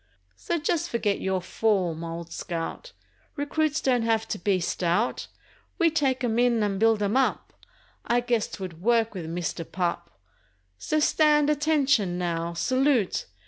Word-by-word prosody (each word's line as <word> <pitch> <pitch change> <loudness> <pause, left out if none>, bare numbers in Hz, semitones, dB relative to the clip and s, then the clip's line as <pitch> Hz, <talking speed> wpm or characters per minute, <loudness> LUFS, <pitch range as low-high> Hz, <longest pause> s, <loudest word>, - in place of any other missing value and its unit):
So 340 - -2
just 330 +1 -1
forget 215 -4 -1
your 190 -1 -1
form, 185 -6 0
old 170 0 -6
scout; 170 - -5 0.4
Recruits 310 +1 0
don't 250 -4 +1
have 225 -1 0
to 210 - -3
be 190 +1 +1
stout; 175 +5 -1 0.5
We 335 -3 +3
take 270 -5 0
'em 235 -1 +1
in 240 -3 +3
and 200 -2 -1
build 225 -1 +3
'em 205 +3 0
up— 265 -1 0 0.5
I 240 +1 +1
guess 240 -3 0
'twould 180 -4 -8
work 230 +1 +2
with 175 -5 -6
Mister 170 0 -3
Pup— 175 +1 -3 0.7
So 310 - 0
stand 300 -1 +3
ATTENTION, 285 - +2
now—Salute! 180 - 0
225 Hz, 140 wpm, -26 LUFS, 180-275 Hz, 0.7 s, We